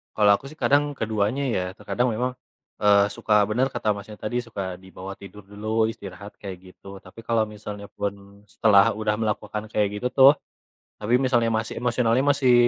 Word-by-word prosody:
Kalau 105 -1 +5
aku 115 - -10
sih 155 - -14
kadang 145 -1 +3
keduanya 110 +5 0
ya. 90 - 0
Terkadang 120 +5 -1
memang, 125 +3 -1 0.5
eee, 100 -1 +5
suka 105 0 +3
bener 125 +5 +2
kata 120 -4 0
Masnya 105 +1 -9
tadi, 120 +4 -2
suka 100 -6 -5
dibawa 95 +1 -9
tidur 100 +1 -13
dulu, 110 +2 -1
istirahat, 100 0 -10
kayak 95 -3 -6 0.2
gitu. 100 0 -12
Tapi - - -14
kalau 115 -1 +1
misalnya 105 -1 -8
pun 100 0 -6
setelah 100 -3 +5
udah 110 -1 0
melakukan 105 -1 -2
kayak 105 -2 +1
gitu 125 - +1
tuh, 135 +1 +8 0.7
tapi 120 +4 +2
misalnya 120 -3 +2
masih 110 0 -2
emosionalnya 120 +1 +1
masih 135 -3 +3
105 Hz, 170 wpm, -24 LUFS, 100-120 Hz, 0.7 s, tuh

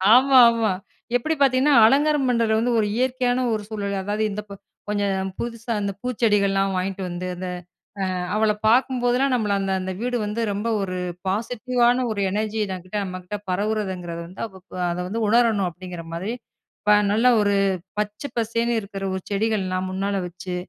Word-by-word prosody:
ஆமா, 265 +1 +6
ஆமா. 225 -3 +1 0.5
எப்படி 315 +6 -1
பாத்தீங்கன்னா, 270 +2 +4
அலங்காரம் 285 +2 +3
பண்றதுல 230 -2 +2
வந்து 240 +2 +1
ஒரு 210 - +1
இயற்கையான 255 0 +1
ஒரு 215 -1 -2
சூழல். 200 -2 -3
அதாவது, 210 +1 -1
இந்த 210 +1 -4
ப - - -7 0.4
கொஞ்சம் 195 -2 0
புதுசா 235 0 -4
அந்த 200 0 -1
பூச்செடிகள்லாம் 200 -5 +1
வாங்கிட்டு 190 +1 -2
வந்து, 175 +1 -4
அந்த 185 +1 -5 0.5
அ - - +1 0.3
அவள 215 0 +3 0.2
பாக்கும்போதெல்லாம், 250 +2 +2
நம்மள 210 -4 0
அந்த 195 0 -1
அந்த 190 0 -3
வீடு 245 0 0
வந்து 210 +3 -2
ரொம்ப 205 +3 -3
ஒரு 185 -2 -3 0.3
பாசிட்டிவான 245 +4 +1
ஒரு 205 - -2
எனர்ஜி 215 +2 -1
எனக்கிட்ட 185 +1 -5
நம்மகிட்ட 185 +2 -6
பரவுரதுங்கிறது 185 -4 -2
வந்து, 185 - -10 0.5
அதை 175 - -3
வந்து 225 +5 -3
உணரணும் 225 -4 +3
அப்டிங்கிற 175 -1 -8
மாரி, 190 +7 -3 0.5
இப்போ 210 0 +5 0.2
நல்லா 230 +4 +4
ஒரு 205 -1 +2 0.4
பச்சை 210 +7 -3
பசேன்னு 230 +1 0
இருக்கிற 195 -1 -7
ஒரு 190 - -4
செடிகள்லாம் 195 -3 0
முன்னால 195 +1 -1
வச்சு, 180 +1 -6
210 Hz, 155 wpm, -23 LUFS, 195-240 Hz, 0.5 s, ஆமா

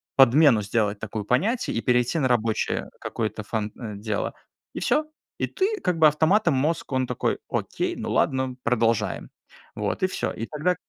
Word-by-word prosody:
подмену 135 -3 +6
сделать 105 0 0
такую 110 -1 -5
понятий, 205 - +1
и 115 - -1
перейти 125 +6 +2
на 135 - +2
рабочее 115 -2 0
какое-то 110 -1 -3
фан 110 0 -3
э, 110 -4 -6
дело 105 0 -2 0.4
И - - -4
всё. 305 - +2 0.3
И - - 0
ты 415 +3 -1
как 180 -3 0
бы 155 - +8
автоматом 160 +4 +3
мозг, 150 +5 -1
он 130 -1 0
такой 125 - -1
окей, - - -2
ну - - -4
ладно, 130 -1 +1
продолжаем. 115 -2 0 0.5
Вот - - -2
и - - +5
всё. 185 - -2
И 115 - -4
тогда 160 +4 0
125 Hz, 170 wpm, -25 LUFS, 110-160 Hz, 0.5 s, бы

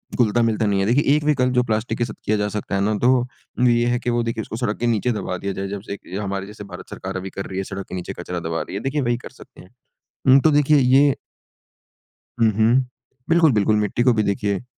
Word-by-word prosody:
घुलता-मिलता 115 -1 +2
नहीं 100 -1 +1
है। 95 - +1
देखिए 125 +7 +3
एक 150 - 0
विकल्प 130 -4 +2
जो 125 0 +3
प्लास्टिक 110 0 -2
के 120 - 0
साथ 110 - -7
किया 110 - +2
जा 105 0 0
सकता 105 -1 -4
है 95 - +1
ना, 105 +2 +1
तो 125 - +3
वो 125 0 -1
ये 120 0 +3
है 120 0 +1
कि 125 - -3
वो 120 0 +1
देखिए 115 -1 -2
उसको 110 - -7
सड़क 115 -4 -2
के 120 - 0
नीचे 120 +2 +1
दबा 95 -4 -3
दिया 100 +2 -4
जाए। 95 +1 -4
जब 100 0 -5
से 100 - -4 0.2
हमारे 100 -1 -3
जैसे 105 0 -10
भारत 90 -3 -10
सरकार - - -6
अभी 95 +1 -5
कर 100 - -6
रही 95 - -6
है 95 - -1
सड़क 100 0 -6
के - - -5
नीचे 90 - -5
कचरा 90 0 -4
दबा 80 0 -3
रही 95 - -7
है। 100 - -3
देखिए 140 +2 -1
वही 120 -1 0
कर - - -10
सकते 135 - -16
हैं। 90 - -16 0.6
हुँ, 135 +1 +8
तो 160 - +4
देखिए 145 0 +4
ये 135 +1 +5 1.3
हुँ, 110 -1 +4
हुँ। 115 +5 +3 0.4
बिल्कुल, 165 -3 +5
बिल्कुल 105 0 +2
मिट्टी 105 +3 0
को 125 -2 +4
भी 110 -1 +1
देखिए 100 +1 -1
110 Hz, 255 wpm, -22 LUFS, 100-125 Hz, 1.3 s, हुँ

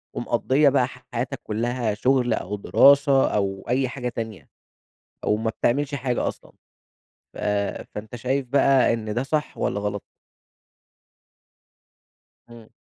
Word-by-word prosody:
ومقضية 140 +2 +2
بقى 130 -2 +2
حياتها 125 -1 -5
كلّها 115 0 -1
شغل 125 +1 +2
أو 105 -1 -3
دراسة 140 +5 +5
أو 95 -1 -1
أي 130 +1 +1
حاجة 125 -2 -4
تانية، 110 -4 -7 0.8
أو 105 - +2
ما 110 +1 -1
بتعملش 140 +6 0
حاجة 125 -2 -1
أصلًا. - - -10 0.8
ف - - -11 0.6
فأنت 105 +3 -7
شايف 130 +3 -1
بقى 135 -1 +4
إن 110 -2 -3
ده 120 - 0
صح 150 +2 -2
والّا 100 - -1
غلط؟ 105 -1 -3 2.5
امم. 115 -2 -14
120 Hz, 120 wpm, -24 LUFS, 110-135 Hz, 2.5 s, دراسة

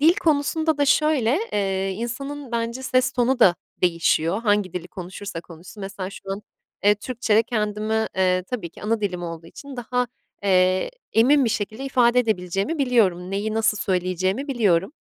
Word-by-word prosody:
dil 325 +4 +6
konusunda 315 -1 +1
da 285 - +4
şöyle, 290 -3 +3
eee, 195 -1 0
insanın 255 +5 -5
bence 235 +2 -2
ses 255 -1 +1
tonu 250 +1 +1
da 190 -7 +6 0.3
değişiyor 170 +2 +2
hangi 205 -4 +1
dili 180 -1 -5
konuşursa 185 0 -7
konuşsun. 170 +5 -13
Mesela 195 -1 -5
şu - - -11
an, 200 - -6 0.4
eee, 205 0 +6
Türkçe'de 225 -1 +1
kendimi, 215 -1 -1
eee, 185 -1 +2
tabii 205 -10 -4
ki - - -15
ana 225 +1 0
dilim 185 -4 -2
olduğu 165 -1 -6
için 280 +8 -10
daha, 250 +1 -1 0.4
eee, 185 -1 +3 0.2
emin 265 +5 +5
bir 230 - +1
şekilde 215 +5 -3
ifade 250 -2 +3
edebileceğimi 195 - -1
biliyorum. 205 -10 +2
Neyi 205 +2 -2
nasıl 220 -1 +2
söyleyeceğimi 185 - -1
biliyorum. 200 -5 +2
215 Hz, 160 wpm, -23 LUFS, 185-250 Hz, 0.4 s, dil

